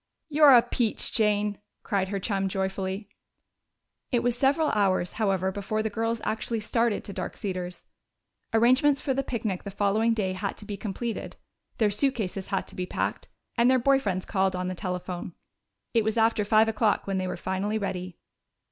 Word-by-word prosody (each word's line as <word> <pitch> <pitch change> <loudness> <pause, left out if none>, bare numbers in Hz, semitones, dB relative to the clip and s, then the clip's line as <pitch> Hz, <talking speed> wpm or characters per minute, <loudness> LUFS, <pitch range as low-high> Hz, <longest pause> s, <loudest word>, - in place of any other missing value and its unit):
"You're 295 -3 +7
a 235 - +5
peach, 240 -2 -1
Jane!" 210 -2 +1 0.2
cried 195 -2 0
her 200 +1 -2
chum 195 -1 -1
joyfully. 190 +1 -2 1.0
It 240 -2 +2
was 245 -1 +1
several 285 +4 +2
hours, 190 -4 +1
however, 190 -2 +1
before 205 +2 -2
the 220 - -2
girls 225 +1 -1
actually 220 +1 -2
started 230 0 0
to 200 - -8
Dark 185 -2 -5
Cedars. 180 -3 -4 0.7
Arrangements 255 +5 +4
for 270 - -1
the 275 - 0
picnic 220 -8 -3
the 200 - -6
following 205 +3 +1
day 190 -4 -1
had 195 +1 -3
to 210 - -9
be 205 - -4
completed; 215 +3 -4 0.4
their 215 -3 +3
suitcases 210 -5 -1
had 195 -1 -1
to - - -11
be 180 0 -3
packed, - - -2 0.3
and 235 +1 +4
their 260 - +5
boy 270 +2 +4
friends 185 -7 -2
called 190 -2 +1
on 180 0 -2
the - - -2
telephone. 180 -1 -4 0.6
It 230 -2 +3
was 220 +1 -1
after 225 -1 +3
five 215 +1 +4
o'clock 220 -1 +1
when 195 -1 -1
they 185 - -2
were - - -3
finally 195 +3 -1
ready. 185 -3 -4
210 Hz, 180 wpm, -27 LUFS, 190-230 Hz, 1.0 s, You're